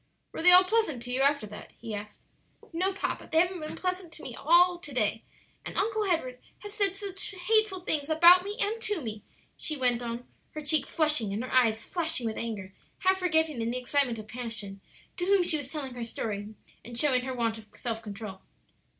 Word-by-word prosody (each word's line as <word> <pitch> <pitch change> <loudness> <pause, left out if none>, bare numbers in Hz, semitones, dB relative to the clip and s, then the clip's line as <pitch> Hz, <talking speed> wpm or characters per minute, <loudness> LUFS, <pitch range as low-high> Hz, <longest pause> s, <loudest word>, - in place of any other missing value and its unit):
"Were - - -5
they 355 - +7
all 365 +1 +10
pleasant 370 - 0
to 245 - -5
you 255 +2 +1
after 280 -4 +3
that?" 210 0 -11
he 225 -2 -7
asked. 210 0 -7 0.5
"No, 370 +4 +1
papa; 390 - -4
they 320 - +4
haven't 360 +1 +1
been 305 -1 -6
pleasant 365 -2 -3
to 315 - -9
me 250 - -6
at - - -10
all 350 +3 +5
to 300 -4 -8
day; 225 -3 0 0.4
and - - -7
Uncle 430 +1 +1
Edward 255 -9 -1 0.2
has 415 -1 -8
said 400 -3 +1 0.5
hateful 435 -4 +3
things 305 -4 -1
about 345 +3 +7
me, 410 +2 -5
and 450 0 -1
to 415 -5 0
me," 220 -6 -5 0.3
she 305 - -3
went 245 -2 +1
on, 235 +1 -5 0.3
her 305 - -5
cheek 305 +1 +3
flushing 300 -10 +2
and 210 +4 -2
her 255 - -6
eyes 230 -3 +3
flashing 325 -8 0
with 220 -1 -3
anger, 205 -5 -5 0.3
half 375 0 +3
forgetting, 320 -7 +1
in 225 - -1
the 245 - -2
excitement 255 -1 0
of 215 -1 -8
passion, 220 -5 -6 0.4
to 355 - -1
whom 390 -1 +4
she 325 -3 +1
was 275 -1 -7
telling 275 -5 -5
her 245 -1 -5
story, 215 -2 -5 0.3
and 240 0 -9
showing 260 -4 +3
her 260 +1 -4
want 230 -2 -1
of 215 - -15
self 225 -2 -4
control. 205 -3 -8
280 Hz, 210 wpm, -28 LUFS, 230-355 Hz, 0.5 s, all